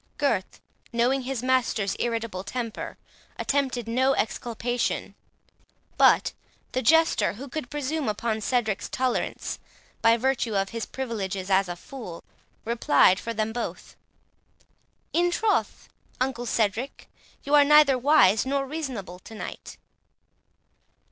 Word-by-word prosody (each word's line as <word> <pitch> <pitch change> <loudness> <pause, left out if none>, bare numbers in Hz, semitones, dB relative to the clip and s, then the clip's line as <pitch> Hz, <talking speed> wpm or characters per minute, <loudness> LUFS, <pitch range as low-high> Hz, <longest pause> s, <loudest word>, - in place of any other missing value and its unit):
Gurth, 230 -10 -1 0.3
knowing 245 +3 +2
his 255 -1 -4
master's 245 -6 +1
irritable 230 -5 -2
temper, 230 +1 -5 0.4
attempted 260 -4 -1
no 260 +4 +2
exculpation; 240 +1 -2 0.8
but - - +4 0.4
the 255 - -1
Jester, 325 - +4
who 255 +7 -8
could 270 -2 -5
presume 295 -2 -2
upon 220 +1 -2
Cedric's 220 -3 0
tolerance, 255 -1 -2 0.4
by 230 +1 +5
virtue 245 -3 0
of 195 0 +1
his 230 -1 -5
privileges 200 -7 -4
as 190 -1 +3
a 175 - -3
fool, 185 -3 -9 0.4
replied 200 -5 +4
for 230 - -4
them 220 0 -2
both; 240 - -5 1.2
"In 350 +1 +3
troth, 420 +4 0 0.3
uncle 255 -2 -1
Cedric, 225 +4 -1 0.4
you 285 - -3
are 290 -1 +8
neither 300 -1 +6
wise 245 -6 +5
nor 275 +1 -1
reasonable 260 - -5
to 220 +4 -12
night." - - -8
240 Hz, 120 wpm, -26 LUFS, 215-270 Hz, 1.2 s, are